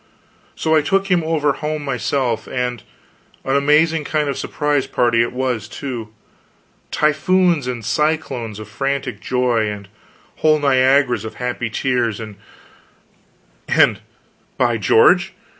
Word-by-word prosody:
So 160 - 0
I 155 - +4
took 195 +6 0
him 175 -2 +3
over 155 -3 +1
home 150 0 -4
myself; 125 -3 -1
and 125 -2 -3 0.6
an 135 - 0
amazing 150 +3 +3
kind 150 0 -1
of - - 0
a - - -9
surprise 145 -2 -1
party 120 -3 +2
it 120 - 0
was, 125 -4 -2
too 120 -4 -6 0.8
typhoons 155 0 +2
and 120 -3 -4
cyclones 150 -9 -1
of 110 -1 -9
frantic 135 0 -3
joy, 120 -3 0
and 100 -1 -7 0.5
whole 155 -1 +3
Niagaras 130 -4 +3
of 110 - -7
happy 125 -1 -3
tears; 120 -2 -1
and 110 -3 -8 2.2
by 120 -2 +2
George! 180 - +4
130 Hz, 125 wpm, -19 LUFS, 120-150 Hz, 2.2 s, I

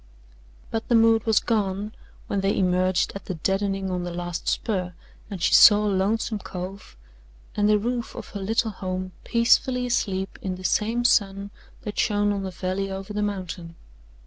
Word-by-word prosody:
But 225 0 -3
the 240 - +3
mood 225 0 +4
was 220 -1 +5
gone 210 -1 -1 0.3
when 200 - -1
they 195 +1 +1
emerged 185 -1 +2
at 195 - -8
the 185 - -4
"deadening" 195 +2 -1
on 180 -1 -2
the 175 - -4
last 175 0 -5
spur 180 -6 -1 0.3
and 200 -3 -6
she - - +1
saw 210 -1 +8
Lonesome 205 +2 0
Cove 185 - -8 0.6
and 205 0 +2
the 210 - +5
roof 235 +2 -3
of - - -8
her 200 - -6
little 220 +3 0
home 185 -1 -4
peacefully 250 +2 +2
asleep 195 -6 -1
in 185 -1 -3
the 185 - -11
same 230 +6 +1
sun 200 -3 +2 0.3
that 210 -3 -5
shone 205 -1 +2
on 200 - -3
the 190 - -4
valley 185 +2 -3
over 195 +2 -6
the 210 - -1
mountain. 185 -4 -4
200 Hz, 170 wpm, -25 LUFS, 185-215 Hz, 0.6 s, saw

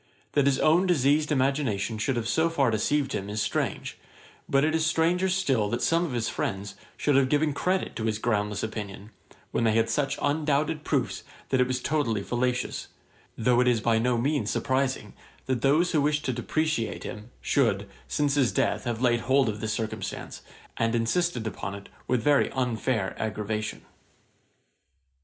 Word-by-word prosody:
That 145 -1 +3
his 135 -1 +3
own 170 +6 +4
diseased 150 -2 +2
imagination 130 -6 0
should 130 +5 0
have 115 -1 -2
so 160 +7 +2
far 140 -7 +2
deceived 135 +6 0
him, 100 +1 -3
is 105 +1 -3
strange; - - -2 0.5
but 140 +1 +3
it 155 - +1
is 160 0 +1
stranger 170 +4 +2
still 135 - +1
that 120 +3 -2
some 165 +1 +3
of 150 - -4
his 120 -2 -1
friends 100 +1 -3 0.2
should 145 - +2
have 135 -1 +4
given 150 +1 +2
credit 185 +6 -1
to 110 - -2
his 110 -1 0
groundless 105 -3 -1
opinion, 105 -1 -6 0.4
when - - 0
they 110 -1 +3
had 115 0 +2
such 140 -2 0
undoubted 150 +1 0
proofs - - -1 0.3
that 130 -1 +2
it 125 - +3
was 130 0 -1
totally 120 -10 0
fallacious; 125 +2 -1 0.5
though 120 +2 +3
it 125 - +2
is 120 -2 +3
by 115 0 +2
no 120 +1 +1
means 140 +5 0
surprising 130 -5 -1 0.3
that 130 -3 -1
those 155 +6 +3
who 155 - +2
wish 150 +1 +1
to 130 - -1
depreciate 125 0 -1
him, 105 +2 -7
should, 105 -7 +1 0.2
since 145 -1 +1
his 135 -4 +3
death, - - 0
have 120 0 -2
laid 120 -1 +3
hold 130 +2 +2
of 105 0 -5
this 110 -1 -2
circumstance, 110 -1 -5 0.4
and 115 +1 +1
insisted 120 +2 0
upon 100 -3 -4
it 100 - -11 0.2
with 125 -3 +1
very 145 +1 +4
unfair 125 -5 -1
aggravation. 105 0 -3
125 Hz, 175 wpm, -27 LUFS, 110-150 Hz, 0.5 s, own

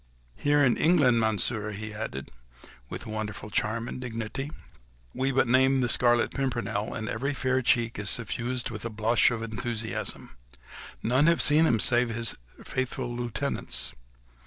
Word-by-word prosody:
Here 145 0 +3
in 125 - +3
England, 145 -8 +4
Monsieur," 110 0 0
he 110 +1 -6
added, 105 -12 -6 0.6
with - - -6
wonderful 110 -1 -5
charm 115 +3 -1
and 125 - -6
dignity, 120 +3 -4 0.6
"we 135 +1 0
but 135 -1 +2
name 130 +2 +4
the 120 - +1
Scarlet 120 0 +3
Pimpernel, 120 -6 -2
and 110 -1 -4
every 140 +5 -2
fair 130 0 +1
cheek 120 -1 +1
is 105 -1 0
suffused 120 +2 -1
with 110 -2 -6
a 115 - -2
blush 110 +2 +3
of 115 -2 -3
enthusiasm. 115 - -4 0.7
None 130 +7 +3
have 170 0 +4
seen 155 +2 +4
him 115 -5 +2
save 120 +2 +3
his 115 0 -1 0.3
faithful 130 -1 -3
lieutenants. 120 +3 -1
120 Hz, 150 wpm, -27 LUFS, 110-130 Hz, 0.7 s, England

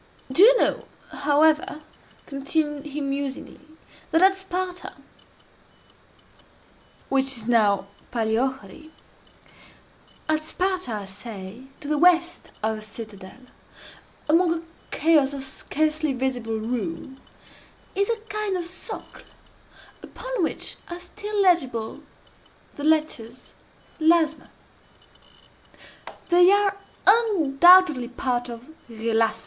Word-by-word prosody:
Do 265 - +3
you - - +8
know, - - +1 0.2
however," 305 +1 +2 0.4
continued 295 +1 -2
he 295 +1 -5
musingly, 275 0 -4 0.5
"that 325 +2 +3
at 385 0 +6
Sparta 370 -1 -5 2.1
(which 270 0 +1
is 235 -5 -1
now 210 -5 +3 0.3
Palæochori,) 235 +3 -2 1.4
at 310 0 +1
Sparta, 365 -3 -2
I 205 -2 -4
say, 200 +3 -9 0.2
to 285 - -8
the 300 0 0
west 350 0 +3
of 220 0 0
the - - -9
citadel, 215 0 -10 0.9
among 335 +2 +3
a 330 - -6 0.3
chaos 300 -4 +3
of 275 -1 -5
scarcely 305 +2 -1
visible 245 -3 -2
ruins, 220 +1 -4 0.7
is 400 +2 0
a 460 - +1
kind 420 -3 -2
of 355 - -3
socle, 365 +2 -9 0.8
upon - - -5
which 320 - -2
are 345 0 -6
still 410 +4 -5
legible 260 - +1 0.7
the 290 - -7
letters 300 -6 -1 0.5
ΛΑΞΜ. 320 -1 +2 1.8
They 355 +1 +6
are 405 -1 +3 0.3
undoubtedly 355 - +5
part 245 -1 -2
of 235 +2 -9 0.2
ΓΕΛΑΞΜΑ. 225 0 0
290 Hz, 100 wpm, -24 LUFS, 240-350 Hz, 2.1 s, you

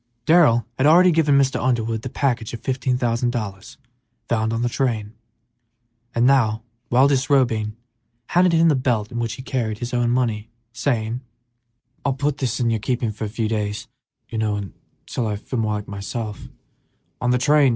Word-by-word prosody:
Darrell 150 -9 +5
had 135 - +4
already 180 +3 +7
given 155 -4 +3
Mr. 135 -1 +2
Underwood 115 -3 0
the 130 - -5
package 120 -4 -1
of 115 - -10
fifteen 130 -1 -1
thousand 120 0 0
dollars 105 -4 -5 0.5
found 110 -1 0
on 115 +1 -1
the - - +2
train, 115 -4 -1 1.0
and 120 +1 +3
now, 115 -5 +3 0.3
while 130 +3 +5
disrobing, 130 -6 +1 0.5
handed 180 0 +4
him 165 0 +4
the 160 - +5
belt 120 -5 0
in 120 - -4
which 115 -1 -2
he 130 - -8
carried 115 -6 -2
his 120 +2 -5
own 120 -1 +2
money, 115 -3 0 0.2
saying, 120 -1 -1 0.8
"I'll 140 - +1
put 140 +1 -1
this 125 -5 -1
in 120 -2 +1
your 110 - 0
keeping 120 0 -1
for 110 +1 -5
a - - -4
few 110 +1 -2
days, 105 -1 -2 0.4
till 110 +1 -4
I 105 - -1
feel 115 +4 -4
more 110 -1 0
like 105 0 -5
myself. 105 +2 -5
120 Hz, 160 wpm, -22 LUFS, 110-130 Hz, 1.0 s, already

